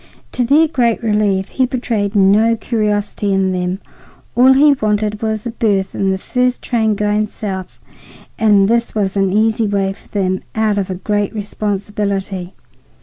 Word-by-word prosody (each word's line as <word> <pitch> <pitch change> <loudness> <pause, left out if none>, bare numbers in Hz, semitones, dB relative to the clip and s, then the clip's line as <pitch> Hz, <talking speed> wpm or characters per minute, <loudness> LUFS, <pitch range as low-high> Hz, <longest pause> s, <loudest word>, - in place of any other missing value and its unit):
To 250 - -1
their 295 +6 +4
great 245 -6 0
relief, 205 -3 +1
he 260 -1 0
betrayed 225 -5 -2
no 210 +4 +4
curiosity 210 -3 -1
in 190 -1 +1
them. 180 0 -2 0.6
All 255 +2 +6
he 285 +2 +5
wanted 210 -3 -1
was 220 -1 -2
a 235 - -3
berth 200 -4 0
in 195 - 0
the 190 - 0
first 250 +5 -1
train 220 -3 +1
going 210 +1 0
south, 190 -3 -6 0.6
and 205 -3 +4
this 235 +1 0
was 200 -2 -1
an 195 -1 +1
easy 220 +2 +2
way 195 -1 0
for 195 - -22
them 185 -2 -1
out 215 -2 +1
of 195 - -3
a 185 - -3
great 205 +3 -2
responsibility. 200 -2 -3
210 Hz, 160 wpm, -17 LUFS, 195-225 Hz, 0.6 s, All